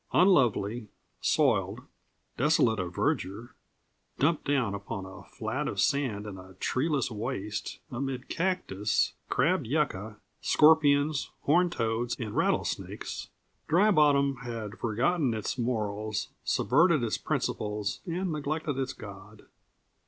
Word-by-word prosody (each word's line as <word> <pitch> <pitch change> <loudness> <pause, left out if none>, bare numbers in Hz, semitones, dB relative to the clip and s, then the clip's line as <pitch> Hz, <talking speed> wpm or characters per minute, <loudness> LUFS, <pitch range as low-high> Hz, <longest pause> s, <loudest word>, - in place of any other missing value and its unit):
Unlovely, 120 - +3 0.3
soiled, - - +2 0.5
desolate 125 -6 +3
of 90 -1 -4
verdure, 100 +6 -1 0.6
dumped 150 +3 +1
down 135 -8 +1
upon 100 0 -5
a 95 -1 -10
flat - - -3
of - - -3
sand 125 -8 +1
in 100 -3 -7
a 95 0 -13
treeless 135 - 0
waste, 105 -2 -4
amid 130 +1 -4
cactus, 165 - 0 0.2
crabbed 150 0 +2
yucca, 110 -7 -1 0.2
scorpions, 150 -2 +4
horned 175 +4 +3
toads, 115 +1 -1
and 110 -3 -4
rattlesnakes. - - -1 0.4
Dry 190 +7 +4
Bottom 140 -5 +4
had 115 -4 -6
forgotten 125 +4 +1
its 110 +4 -3
morals, 110 -3 -2
subverted 155 +1 +3
its 115 - -1
principles, 105 -1 -2
and 175 +1 -2
neglected 150 -1 -2
its 130 -1 -2
God. 100 0 -11
125 Hz, 115 wpm, -29 LUFS, 105-150 Hz, 0.6 s, scorpions